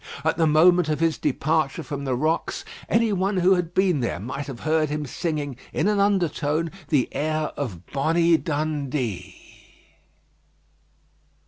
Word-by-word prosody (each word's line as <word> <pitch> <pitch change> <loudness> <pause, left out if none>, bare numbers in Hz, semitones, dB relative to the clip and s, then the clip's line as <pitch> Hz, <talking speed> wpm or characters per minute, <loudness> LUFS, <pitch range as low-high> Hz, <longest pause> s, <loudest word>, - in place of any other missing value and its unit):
At 160 +1 +1
the 160 -1 +2
moment 170 +2 +5
of 155 - 0
his 165 -1 +1
departure 155 0 0
from 140 0 -5
the 130 -2 0
rocks, 155 +6 -1 0.2
any 230 -2 +2
one 195 +1 0
who 185 +1 +5
had 175 -2 -1
been 185 -5 +3
there 120 -8 -2
might 135 +7 -5
have 130 -4 -7
heard 155 -1 +1
him 150 0 -2
singing, 145 -2 -3
in - - 0
an 210 -1 +2
undertone, 165 -5 +1 0.2
the 140 -6 +2
air 155 +1 -1
of 100 - -5
"Bonnie 165 +4 +2
Dundee." 145 - -3
155 Hz, 145 wpm, -24 LUFS, 140-170 Hz, 0.2 s, moment